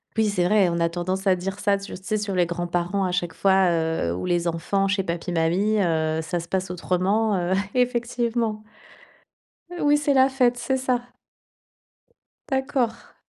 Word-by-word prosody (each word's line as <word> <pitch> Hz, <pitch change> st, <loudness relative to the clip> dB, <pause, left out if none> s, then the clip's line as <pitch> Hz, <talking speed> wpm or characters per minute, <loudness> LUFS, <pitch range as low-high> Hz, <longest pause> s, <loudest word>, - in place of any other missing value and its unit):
P 220 Hz, -, +2 dB
oui, 215 Hz, -, +1 dB
c'est 180 Hz, -3 st, 0 dB
vrai, 200 Hz, -1 st, +4 dB
on 170 Hz, 0 st, -1 dB
a 170 Hz, 0 st, +2 dB
tendance 185 Hz, +3 st, -3 dB
à 190 Hz, -, +5 dB
dire 190 Hz, +2 st, -5 dB
ça 200 Hz, -1 st, +2 dB
tur 200 Hz, +1 st, -8 dB
sais, 215 Hz, +3 st, -1 dB
sur 205 Hz, -1 st, -3 dB
les 180 Hz, -1 st, +3 dB
grands 175 Hz, +1 st, -3 dB
parents 175 Hz, +3 st, -1 dB
à 180 Hz, -, -1 dB
chaque 175 Hz, -2 st, -2 dB
fois, 190 Hz, -1 st, +3 dB
heu, 160 Hz, -, 0 dB
ou -, -, -4 dB
les 175 Hz, -1 st, 0 dB
enfants 180 Hz, +4 st, 0 dB
chez 195 Hz, 0 st, 0 dB
papi 170 Hz, 0 st, -4 dB
mamie, 175 Hz, +6 st, +1 dB
heu, 160 Hz, -3 st, 0 dB
ça 175 Hz, +2 st, -2 dB
se 170 Hz, -, -8 dB
passe 190 Hz, 0 st, -2 dB
autrement, 195 Hz, +5 st, 0 dB
heu, 175 Hz, +1 st, 0 dB, 0.2 s
effectivement, 235 Hz, -3 st, 0 dB, 1.2 s
oui, 290 Hz, 0 st, +4 dB
c'est 290 Hz, -1 st, +1 dB
la 265 Hz, 0 st, +5 dB
fête, 250 Hz, -2 st, +2 dB
c'est 245 Hz, +2 st, -1 dB
ça. 255 Hz, -2 st, 0 dB, 1.5 s
D'accord. 265 Hz, -4 st, -2 dB
195 Hz, 180 wpm, -24 LUFS, 175-225 Hz, 1.5 s, à